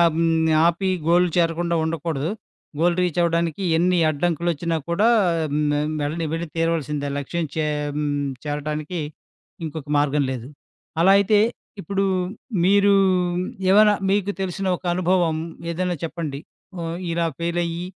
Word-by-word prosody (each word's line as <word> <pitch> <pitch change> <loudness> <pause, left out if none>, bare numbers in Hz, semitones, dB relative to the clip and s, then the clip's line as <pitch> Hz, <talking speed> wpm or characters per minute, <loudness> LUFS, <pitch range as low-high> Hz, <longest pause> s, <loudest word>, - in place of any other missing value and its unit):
హ్మ్. 165 -1 +2 0.2
ఆపి, 185 +3 0 0.2
గోల్ 175 +2 +5
చేరకుండా 170 0 +1
ఉండకూడదు. 160 -1 -2 0.5
గోల్ 175 +1 +3
రీచ్ 175 -2 -1
అవ్వడానికి 170 +1 0
ఎన్ని 180 +2 +2
అడ్డంకులొచ్చినా 165 +1 -1
కూడా, 200 +6 +3 0.5
మ్ 150 -1 +1 0.3
వెళ్ళని 160 +3 -2
వెళ్లి 165 +1 -3
తీరవలసిందే. 150 -3 -1
లక్ష్యం 165 +4 -2
చే 155 -1 0 0.3
మ్ 150 - -1 0.4
చేరటానికి 150 +3 -3 0.7
ఇంకొక 155 -1 -6
మార్గం 145 0 +2
లేదు. 125 -2 -5 0.5
అలా 190 - +6
అయితే, 205 +1 +3 0.4
ఇప్పుడు 195 +4 -1 0.6
మీరు 200 +1 +5 0.8
ఏమైనా 210 +2 +6 0.2
మీకు 200 0 +1
తెలిసిన 190 +1 -2
ఒక - - -27
అనుభవం 180 -2 +1 0.4
ఏదైనా 180 +1 -2
చెప్పండి. 155 -4 -5 0.4
హ్మ్. 165 0 -4 0.2
ఇలా 170 0 +1
ఫెయిల్ 170 +1 -1
అయ్యి, 170 +1 -4
170 Hz, 125 wpm, -22 LUFS, 155-180 Hz, 0.8 s, అలా